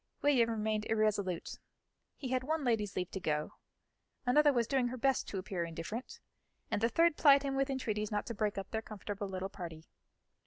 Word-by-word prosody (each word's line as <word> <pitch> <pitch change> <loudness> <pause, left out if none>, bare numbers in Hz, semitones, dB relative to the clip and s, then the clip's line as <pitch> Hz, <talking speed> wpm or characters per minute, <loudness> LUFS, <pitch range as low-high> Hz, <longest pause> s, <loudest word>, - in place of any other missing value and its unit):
William 260 -5 +4
remained 215 -1 -1
irresolute; 205 -5 0 0.6
he 260 - -5
had 255 0 +1
one 315 +2 -1
lady's 210 -4 +1
leave 180 -1 -2
to 190 - -4
go, 150 -3 -1 0.7
another 290 +4 +5
was 240 -3 +2
doing 260 0 +1
her 255 +1 -4
best 270 +1 +1
to 200 - -4
appear 185 -2 -2
indifferent, 170 +9 -6 0.5
and - - 0
the 230 - +3
third 330 +5 +3
plied 280 -2 +7
him 275 -1 -1
with 275 +1 +1
entreaties 215 -6 -1
not 205 -1 -1
to 235 - -4
break 210 -1 -1
up 195 -1 -5
their 220 - -1
comfortable 205 -2 -5
little 190 0 -3
party. 170 -5 -8
220 Hz, 190 wpm, -33 LUFS, 195-260 Hz, 0.7 s, plied